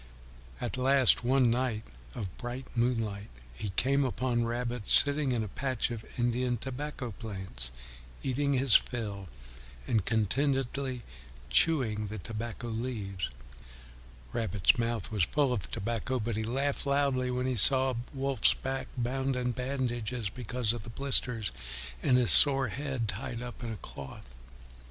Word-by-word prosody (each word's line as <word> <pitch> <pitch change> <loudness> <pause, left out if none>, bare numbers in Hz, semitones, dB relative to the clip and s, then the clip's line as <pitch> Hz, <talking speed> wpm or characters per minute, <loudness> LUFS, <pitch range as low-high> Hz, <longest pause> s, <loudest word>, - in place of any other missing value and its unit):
At - - -4
last, 130 -1 +3
one 125 -1 +3
night 120 -3 -1 0.3
of 95 -4 -6
bright 125 +2 -6
moonlight, 115 -4 -1 0.2
he 100 - -6
came 135 +8 +1
upon 125 -2 -1
Rabbit 120 -1 -4
sitting 145 -1 +8
in 115 -3 -1
a - - -5
patch 130 +4 -3
of 115 -2 -6
Indian 120 0 0
tobacco 130 +1 -6
plants, 95 - -5 0.5
eating 140 +2 -1
his 130 -3 +1
fill 105 -5 -1 0.6
and 110 -4 0
contentedly 130 +4 -1 0.5
chewing 110 - +3
the 105 +2 -6
tobacco 115 +3 -6
leaves. 110 - -4 1.0
Rabbit's 105 -2 +1
mouth 115 -4 -3
was 105 -3 -1
full 135 - +1
of 100 -8 -5
tobacco, 120 +4 -3
but 115 0 -3
he 110 - -2
laughed 135 +5 -2
loudly 140 -2 0
when 125 0 -2
he 130 - -1
saw 130 +4 +8 0.2
Wolf's 135 -4 +1
back 135 0 -5
bound 130 +2 -2
in 125 -1 -1
bandages 120 -4 -3
because 120 -1 -2
of 120 - -6
the 110 - -10
blisters, 125 -5 0 0.5
and 125 - +3
his 125 -2 +5
sore 135 -3 +8
head 130 -2 -4
tied 115 +4 -5
up 120 0 -9
in 115 - -4
a 110 - -6
cloth. 65 -6 -10
120 Hz, 140 wpm, -29 LUFS, 110-130 Hz, 1.0 s, sitting